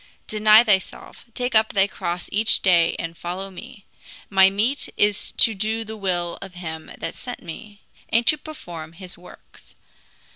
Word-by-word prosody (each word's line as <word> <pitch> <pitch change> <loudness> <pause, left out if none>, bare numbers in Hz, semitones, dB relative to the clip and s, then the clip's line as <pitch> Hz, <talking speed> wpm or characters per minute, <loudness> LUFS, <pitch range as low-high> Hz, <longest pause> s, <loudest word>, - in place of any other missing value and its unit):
Deny 215 +1 +5
thyself, 205 -5 -1
take 245 -1 -2
up 220 0 +3
thy 195 -1 +4
cross 175 -3 -5
each 215 +2 +3
day 175 -3 +4
and 165 0 -5
follow 185 +4 -6
me. 190 +2 -12 0.5
My 190 -1 +6
meat 220 +8 -1
is 205 0 +1
to 230 -3 +5
do 220 +3 -2
the 220 0 -8
will 180 -4 -3
of 190 -2 -10
him 160 -3 -7
that - - -5
sent 245 -1 -7
me, 205 +5 -10 0.3
and 230 +1 +2
to 305 - +5
perform 170 - -9
his 180 +1 -10
works. 180 - -17
195 Hz, 160 wpm, -22 LUFS, 175-220 Hz, 0.5 s, My